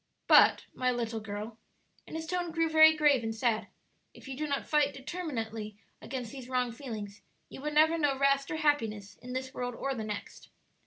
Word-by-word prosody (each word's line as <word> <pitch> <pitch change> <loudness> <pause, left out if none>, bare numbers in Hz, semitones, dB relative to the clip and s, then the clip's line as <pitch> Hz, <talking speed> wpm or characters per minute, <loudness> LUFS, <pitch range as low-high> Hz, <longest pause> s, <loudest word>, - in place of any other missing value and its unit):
But, - - +6
my 255 0 0
little 235 -2 -2
girl," 215 +1 -7 0.5
and - - -8
his 320 0 -4
tone 355 0 -2
grew 330 0 +1
very 315 0 +7
grave 290 -5 +4
and 225 0 -3
sad, 225 -2 0 0.5
"if - - -13
you 270 - -5
do 305 +3 -3
not 280 -1 -2
fight 295 -2 +2
determinately 230 - -5 0.2
against 250 -3 -5
these 260 -2 -9
wrong 250 -1 0
feelings 220 -5 -7 0.3
you - - -10
will 300 - -2
never 315 +2 +4
know 285 -3 +1
rest 275 0 +2
or - - -2
happiness 225 -10 0
in 250 0 -9
this 260 +1 -4
world 245 -2 -4
or 275 +2 -2
the 225 -4 -4
next. 210 -1 -7
260 Hz, 195 wpm, -30 LUFS, 225-295 Hz, 0.5 s, very